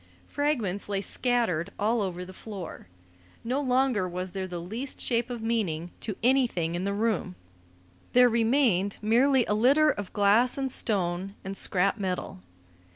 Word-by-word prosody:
Fragments 235 -11 -1
lay 200 -1 0
scattered 225 -6 0
all 220 +2 +1
over 180 -2 -3
the 185 - -11
floor. 195 - -8 0.6
No 255 +5 -1
longer 255 -7 +1
was 180 +1 -5
there 190 0 -4
the 180 -1 -5
least 225 +11 -5
shape 240 0 0
of 240 -2 -5
meaning 180 -8 -1
to 210 - -4
anything 235 -10 +2
in 175 +2 -2
the 200 - -1
room; 215 - -1 0.8
there 250 0 +7
remained 225 -4 +2
merely 250 +3 +4
a - - 0
litter 280 +8 +4
of 205 -7 -6
glass 210 +6 +3
and 270 -1 -2
stone 190 -3 -1
and 195 0 -4
scrap 195 +2 +1
metal. 185 - -3
210 Hz, 155 wpm, -27 LUFS, 185-245 Hz, 0.8 s, there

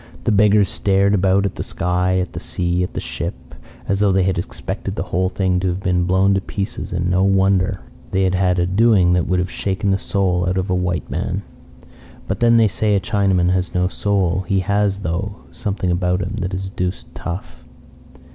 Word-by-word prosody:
The - - +1
beggars 105 -1 +4
stared 100 +1 +2
about 100 0 +3
at 100 - -1
the - - -5
sky, 90 +1 0
at 90 0 -2
the - - -5
sea, 90 0 -1
at 90 - -3
the - - -1
ship, - - -6 0.3
as 100 0 0
though 100 -1 +3
they 95 0 +3
had 95 -1 0
expected 85 - -5
the - - -2
whole 90 +2 0
thing 95 -2 0
to 95 - -1
have 90 +1 -1
been 90 -3 +1
blown 95 +2 +3
to 95 - +1
pieces. 100 +1 -5
And 90 0 -1
no 90 +1 +2
wonder! 95 0 +2 0.3
They 95 0 +1
had 95 -1 +1
had 90 -1 +2
a 90 - +2
doing 95 -2 +4
that 90 -1 +1
would 90 - +1
have 90 0 -1
shaken 100 0 -1
the 95 - +1
soul 90 -3 0
out 90 - -1
of 95 0 -1
a - - +2
white 90 -1 -1
man. - - -2 0.8
But - - -2
then 115 0 +5
they 115 -1 +5
say 105 +1 0
a - - +3
Chinaman 95 -2 +1
has 90 -1 -1
no 90 0 +2
soul. 95 -1 0
He 95 -1 +1
has, 100 +1 0
though, 100 +4 -3 0.2
something 95 -4 -2
about 90 +1 0
him 105 +4 -5
that 95 0 -2
is 95 0 -5
deuced 90 -1 -4
tough. 90 +3 -7
95 Hz, 215 wpm, -20 LUFS, 90-100 Hz, 0.8 s, then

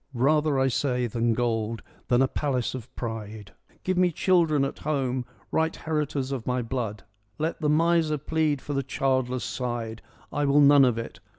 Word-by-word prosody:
Rather, 150 +3 +2
I 135 0 +3
say, 125 -1 0
than 115 0 0
gold, 115 -2 -1 0.2
than 125 +1 +4
a - - +3
palace 130 -3 -1
of 130 -4 -7
pride, 110 -3 -6 0.3
Give 185 -1 0
me 180 -1 +4
children 160 -5 +3
at 135 - -5
home, 130 -4 -1 0.3
right 160 0 +1
heritors 150 -4 -2
of 130 -4 -4
my 125 -1 0
blood. 115 -4 -4 0.3
Let 160 +2 -2
the 150 - +1
miser 160 0 +3
plead 150 -1 0
for 145 - -4
the 135 - +1
childless 130 -1 0
side: 120 -3 -4 0.3
I 145 0 0
will 140 +1 +4
none 145 -1 +7
of 120 -3 +1
it. 115 -5 -6
135 Hz, 175 wpm, -26 LUFS, 120-150 Hz, 0.3 s, none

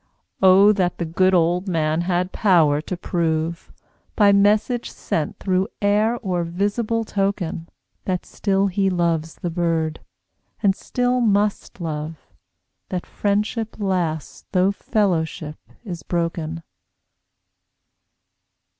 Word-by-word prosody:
Oh 195 +2 +7
that 180 -3 0
the 170 - -2
good 185 +3 +2
old 175 +3 +2
Man 160 -2 +1
had 180 +1 0
power 160 -8 +3
to 180 +3 -5
prove, 165 -1 -2 0.4
By 205 -2 +5
message 210 +4 +2
sent 155 -3 -3
through 190 0 0
air 210 +3 +2
or 180 -3 0
visible 205 +6 -1
token, 195 -5 -2 0.4
That 180 -2 -2
still 195 -1 0
he 195 0 +1
loves 170 -3 0
the 175 - -4
Bird, 165 -2 -1 0.6
and 195 -2 +4
still 250 +3 0
must 205 -3 0
love; 155 -1 -5 0.6
That 180 -2 -3
friendship 210 +2 -1
lasts 180 -6 -2
though 185 +1 +3
fellowship 165 -8 -1 0.2
is 180 -7 -6
broken! 165 -1 -3
185 Hz, 110 wpm, -22 LUFS, 165-200 Hz, 0.6 s, Oh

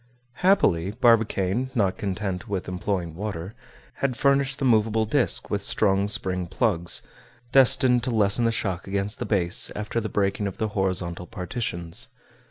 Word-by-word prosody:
Happily, 100 - +2
Barbicane, 115 -1 +2
not 100 -5 +1
content 95 -2 -3
with 95 -3 -3
employing 90 -2 -3
water, 95 0 -5 0.4
had 130 -3 -1
furnished 140 -1 +2
the 135 - -2
movable 110 -2 +2
disc 125 +4 +2
with 100 - -1
strong 100 -1 +2
spring 90 -3 -2
plugs, 95 -3 +1 0.5
destined 130 -1 +5
to - - -1
lessen 110 0 +2
the 115 - +2
shock 95 -5 -3
against 100 +2 -3
the - - -3
base 90 -4 +1
after 110 +2 -3
the 110 - -4
breaking 100 +1 -1
of 95 - -7
the 110 - -2
horizontal 90 -3 -2
partitions. 90 -4 -4
100 Hz, 150 wpm, -24 LUFS, 95-115 Hz, 0.5 s, destined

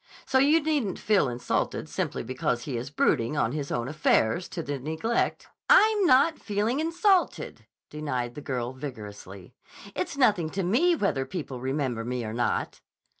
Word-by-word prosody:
So 260 - +2
you 295 +4 +4
needn't 290 - 0
feel 200 -10 +2
insulted 120 0 -2
simply - - -3
because 125 0 -2
he 140 - -4
is 120 +3 -4
brooding 140 -1 +1
on 120 -5 +1
his 145 0 -4
own 120 0 -1
affairs 155 +1 +1
to 170 - -5
the 145 -1 -4
neglect—" 160 - -1 0.2
"I'm 425 -3 +6
not 280 +5 +4
feeling 215 +6 -1
insulted," 345 +4 +1 0.2
denied 130 -6 -3
the 150 - -8
girl 125 -3 -3
vigorously. 105 -7 -9 0.4
"It's 185 +9 -3
nothing 205 - +3
to 195 - +1
me 270 - +3
whether 195 - 0
people 140 -7 -6
remember 130 -3 -2
me 125 0 -3
or 110 - -5
not." 120 +1 -1
150 Hz, 160 wpm, -27 LUFS, -, 0.4 s, I'm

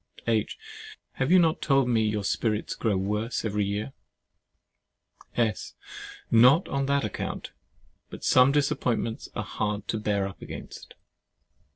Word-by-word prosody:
H. - - 0 0.6
Have 135 +1 0
you 185 - +8
not 165 -3 +3
told 135 -3 +3
me 115 -2 +2
your 105 -1 0
spirits 105 +2 -1
grow 105 -4 0
worse 105 +5 -2
every 105 -1 0
year? 105 +6 -3 1.4
S. 115 -4 -1 0.6
Not 125 +9 +6
on 135 0 -1
that 140 -3 +1
account: 105 - -5 0.6
but - - -10
some 130 +1 +5
disappointments 125 -5 -1
are - - -2
hard 105 0 -3
to 110 - -1
bear 100 -2 0
up 95 - -11
against. - - -9
115 Hz, 135 wpm, -27 LUFS, 105-135 Hz, 1.4 s, you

